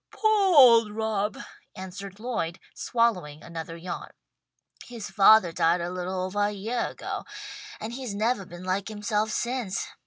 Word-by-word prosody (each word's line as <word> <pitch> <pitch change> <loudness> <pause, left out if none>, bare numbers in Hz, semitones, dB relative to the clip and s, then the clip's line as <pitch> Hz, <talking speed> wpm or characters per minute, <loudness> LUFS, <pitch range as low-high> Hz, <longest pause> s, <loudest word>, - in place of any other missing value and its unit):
"Poah 415 -4 +3
old 230 -5 +8
Rob," 215 -1 -1 0.4
answered 195 +1 -8
Lloyd, 215 -8 -3
swallowing 180 -11 0
another 165 0 -7
yawn. 175 +1 -6 0.8
"His 235 -4 -7
fathah 200 -4 +6
died 165 +2 +2
a 170 +1 -3
little 185 +1 -3
ovah 205 +2 0
a - - -2
yeah 220 +4 -2
ago, - - -6 0.6
and 225 +2 -5
he's 250 -5 -5
nevah 215 -1 0
been 175 +1 -10
like 185 +2 -1
himself 215 0 -1
since. 235 -3 -2
205 Hz, 145 wpm, -27 LUFS, 185-230 Hz, 0.8 s, old